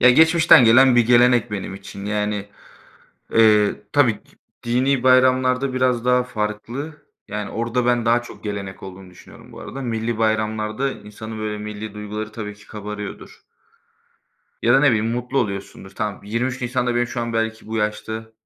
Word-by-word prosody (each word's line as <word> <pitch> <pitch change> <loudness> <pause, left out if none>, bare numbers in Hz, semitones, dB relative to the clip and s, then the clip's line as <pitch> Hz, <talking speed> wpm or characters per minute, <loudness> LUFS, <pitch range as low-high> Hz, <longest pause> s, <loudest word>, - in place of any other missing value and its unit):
Ya, 125 - +7
geçmişten 160 -1 +6
gelen 125 +2 +6
bir 120 -2 +4
gelenek 120 -1 +4
benim 100 -2 -5
için. 100 0 -9
Yani, 105 -1 -2 0.8
eee, 105 -2 +4 0.2
tabii 140 -6 +4
ki - - -26 0.3
dinî 125 +2 +1
bayramlarda 130 +1 +3
biraz 125 -2 +1
daha 125 0 +3
farklı. 120 +7 -4 0.3
Yani 105 -1 -5
orada 120 +2 -2
ben 120 -1 +1
daha 120 +1 +3
çok 120 - -13
gelenek 100 -2 -6
olduğunu 95 -1 -10
düşünüyorum 90 - -16
bu - - -11
arada. 135 - -7
Millî 115 -2 -2
bayramlarda 110 +3 -1
insanın, 110 0 -9
böyle, 105 -1 -3
millî 105 0 -7
duyguları 105 +1 -6
tabii 105 -2 -6
ki 105 0 -19
kabarıyordur. 105 -1 -8 1.2
Ya 120 - +4
da, 135 - +5
ne 145 - +4
bileyim, 110 0 0
mutlu 125 +3 -2
oluyorsundur. 100 -3 -4
Tamam, 105 -2 -4
23 125 +5 -2
Nisan'da 125 0 -1
benim 120 0 +1
şu 120 0 -5
an 115 0 -3
belki 110 0 -2
bu 110 +1 -4
yaşta, 110 +1 -3
115 Hz, 165 wpm, -21 LUFS, 105-125 Hz, 1.2 s, Ya